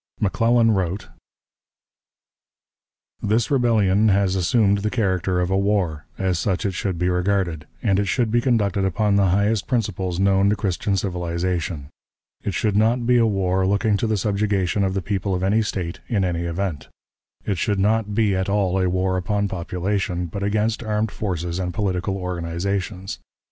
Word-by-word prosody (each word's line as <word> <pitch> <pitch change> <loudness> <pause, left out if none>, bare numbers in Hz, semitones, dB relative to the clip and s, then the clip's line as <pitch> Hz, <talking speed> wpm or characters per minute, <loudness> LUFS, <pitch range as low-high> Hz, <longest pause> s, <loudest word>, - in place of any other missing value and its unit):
McClellan 115 +3 +3
wrote: 95 -1 -1 2.1
"This 110 +3 +1
rebellion 110 -6 +3
has 95 -1 +2
assumed 100 +2 +2
the 105 +2 -1
character 95 -5 0
of 90 +1 0
a 95 - +2
war; 95 -7 0
as 95 -3 0
such 95 +4 -1
it 100 - +1
should 95 0 -2
be 90 +1 0
regarded, 90 -3 0 0.2
and 100 -4 +2
it 100 - +1
should 115 +2 0
be 120 +1 +3
conducted 105 -6 +1
upon 100 +2 +1
the 100 -1 +4
highest 100 +3 +1
principles 95 -7 -1
known 100 0 +3
to 105 - +2
Christian 100 -1 -1
civilization. 85 -4 -2 0.5
It 100 - -2
should 105 -3 0
not 115 +3 +2
be 125 +1 +4
a 115 -1 +4
war 95 -2 +1
looking 100 +2 +2
to 115 - -1
the 110 -1 +1
subjugation 100 -1 0
of 95 0 0
the 95 - -1
people 100 -1 -1
of 90 - -2
any 105 +4 +3
State, 95 -5 -3
in 100 -6 +1
any 85 -1 -1
event. 85 -3 -3 0.6
It 100 -4 -1
should 105 -2 0
not 105 +1 +1
be 105 -3 +2
at 95 +1 -1
all 95 -2 +1
a 90 - +2
war 95 +1 0
upon 100 +2 0
population, 90 0 -2
but 95 +4 -6
against 105 +3 0
armed 110 -1 -1
forces 90 -3 -3
and 90 -1 -3
political 95 -2 -1
organizations. 90 +2 -3
100 Hz, 170 wpm, -22 LUFS, 90-105 Hz, 2.1 s, the